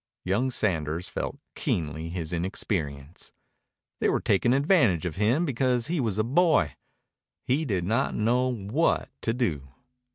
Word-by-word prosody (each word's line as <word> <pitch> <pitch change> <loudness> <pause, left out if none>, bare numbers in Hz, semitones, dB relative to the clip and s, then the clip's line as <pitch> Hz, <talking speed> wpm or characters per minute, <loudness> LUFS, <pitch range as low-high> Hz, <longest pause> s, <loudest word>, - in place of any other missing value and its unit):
Young 105 +8 +1
Sanders 85 -8 -1
felt - - -4 0.2
keenly 80 0 -2
his 85 -1 -4
inexperience. 80 - -3 0.7
They - - +2
were - - +1
taking 105 +4 +2
advantage 135 - +3
of 85 -1 -4
him 120 - +2
because 125 -4 +1
he 170 +1 -1
was 110 -6 -1
a 110 - +2
boy. 155 +7 +3 0.7
He 145 +5 +1
did 95 -9 -1
not 115 +9 0
know 125 +4 +2
what 120 +8 0
to 115 - 0
do. 80 - -1
110 Hz, 140 wpm, -27 LUFS, 85-130 Hz, 0.7 s, advantage